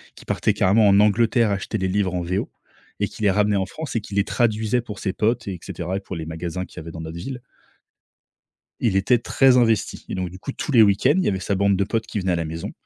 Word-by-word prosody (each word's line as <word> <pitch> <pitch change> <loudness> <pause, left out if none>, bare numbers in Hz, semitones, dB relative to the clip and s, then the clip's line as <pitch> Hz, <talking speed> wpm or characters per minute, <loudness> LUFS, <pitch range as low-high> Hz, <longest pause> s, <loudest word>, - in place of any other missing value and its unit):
qui - - -15
partait - - +1
carrément 105 +3 +4
en 100 0 +5
Angleterre 110 +2 +3
acheter 100 +2 -2
les 95 -2 -1
livres 95 -1 0
en 90 - -1
VO. 90 +3 -2 0.5
Et - - +1
qui - - -8
les 100 - +4
ramenait 105 +1 +2
en 95 - 0
France 145 +2 -5
et - - +2
qui 100 -1 -9
les 100 - +3
traduisait 110 +1 +1
pour 105 -4 -7
ses 95 - -1
potes 110 +1 -1
et 90 -3 -5
cetera 90 +2 -4
et - - -3
pour 95 -1 -8
les 80 -1 -5
magasins 85 +3 -4
qu'il - - -14
y - - -4
avait 80 +1 -8
dans 80 - -8
notre 80 +1 -7
ville. 125 +8 -6 1.4
Il 110 -5 +1
était 120 +6 +3
très 130 +2 +3
investi 115 -3 +1
et - - -4
donc, 90 -1 -3
du 95 - -11
coup, 135 - -6
tous 150 - -4
les 120 -4 +7
week-ends, 105 +7 +4
il 190 - +1
y - - +1
avait 95 - 0
sa 100 - -1
bande 100 0 +2
de 100 - +1
potes 110 +3 -2
qui - - -4
venait 95 -2 0
à 85 - +1
la 85 - -2
maison 80 +1 -6
100 Hz, 270 wpm, -22 LUFS, 95-110 Hz, 1.4 s, les